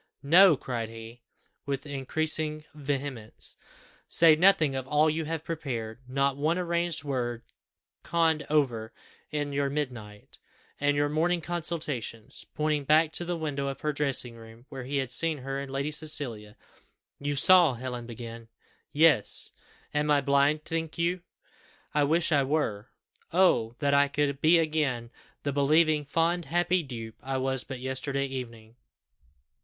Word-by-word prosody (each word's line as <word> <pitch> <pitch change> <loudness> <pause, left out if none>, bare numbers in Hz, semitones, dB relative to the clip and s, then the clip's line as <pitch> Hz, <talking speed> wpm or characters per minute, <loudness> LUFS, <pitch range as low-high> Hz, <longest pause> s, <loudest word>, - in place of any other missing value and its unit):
No," 165 +2 +7
cried 115 -4 -4
he, 115 +1 -11 0.5
with 140 0 -3
increasing 155 +2 -2
vehemence, 140 -6 -5 0.5
"say 165 -2 +6
nothing 160 -4 +4
of 130 -1 -4
all 150 +2 +3
you 160 +1 -2
have 160 0 -4
prepared 125 -10 -5
not 135 +1 +1
one 155 +5 0
arranged 170 -3 -1
word 120 -4 -3 0.6
conned 165 -2 +1
over 120 -7 0 0.4
in 145 -1 -3
your 140 0 0
midnight 120 -8 -6 0.4
and 145 0 +1
your 145 0 +2
morning 165 +4 +1
consultations," 155 -10 -4
pointing 150 -1 0
back 155 +2 +4
to 175 - -1
the 175 0 -3
window 145 -3 -3
of 135 0 -5
her 150 -1 -1
dressing 135 -4 -1
room, 115 +1 -14
where 135 -4 -7
he 140 +2 -2
had 130 -3 -2
seen 160 +5 +3
her 135 +1 -4
and 140 0 -6
Lady 140 +2 -2
Cecilia. 130 -9 -2 0.6
"You 145 0 -2
saw," 170 -1 +6
Helen 125 -1 -6
began 115 -1 -8 0.4
"Yes. 150 -7 +4 0.4
Am 150 0 0
I 145 -1 +5
blind, 140 +2 +2
think 165 -1 -3
you? 170 +2 0 0.7
I 150 -1 +3
wish 165 +3 +2
I 145 -2 +4
were. 130 -7 -1 0.4
Oh! 125 -11 +3
that 140 -1 +1
I 140 0 +5
could 140 -1 -1
be 165 +2 +6
again 150 -7 -1 0.3
the 140 - -1
believing, 150 +2 +3
fond, 165 +3 0
happy 175 +4 +1
dupe 115 -6 -8
I 135 0 -3
was 130 -1 -1
but 135 -2 -7
yesterday 135 +2 -2
evening!" 120 -4 -8
145 Hz, 150 wpm, -28 LUFS, 130-155 Hz, 0.7 s, No